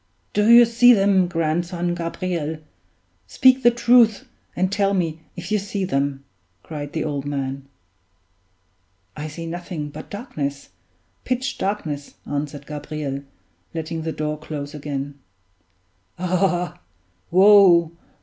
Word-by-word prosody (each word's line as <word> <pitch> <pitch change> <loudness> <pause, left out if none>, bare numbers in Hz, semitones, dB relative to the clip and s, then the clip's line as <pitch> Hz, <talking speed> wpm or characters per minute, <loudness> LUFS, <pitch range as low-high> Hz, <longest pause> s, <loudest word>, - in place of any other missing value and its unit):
"Do 210 +1 +2
you 235 0 +9
see 240 +1 +6
them, 195 -3 +3
grandson 175 +1 -1
Gabriel? 170 -2 -3 0.7
Speak 260 - +4
the 240 - +6
truth, 235 -2 +4 0.3
and 185 +1 0
tell 200 0 +1
me 165 -3 -1 0.2
if 175 +1 -7
you 210 - +2
see 200 -1 -3
them," 140 -4 -1 0.4
cried 145 -2 -7
the 160 - -1
old 145 -3 -3
man. 135 -1 -4 1.5
"I 150 - -5
see 165 +2 -7
nothing 165 -2 -5
but - - -10
darkness 145 - -5 0.5
pitch 255 +2 -2
darkness," 155 -8 -3
answered 145 0 -4
Gabriel, 150 -2 -5 0.5
letting 160 0 -4
the 160 0 -3
door 150 -1 -3
close 145 -2 -6
again. 145 -1 -5 1.0
"Ah! 180 -1 0 0.5
woe! 185 -3 +6
170 Hz, 120 wpm, -22 LUFS, 150-195 Hz, 1.5 s, you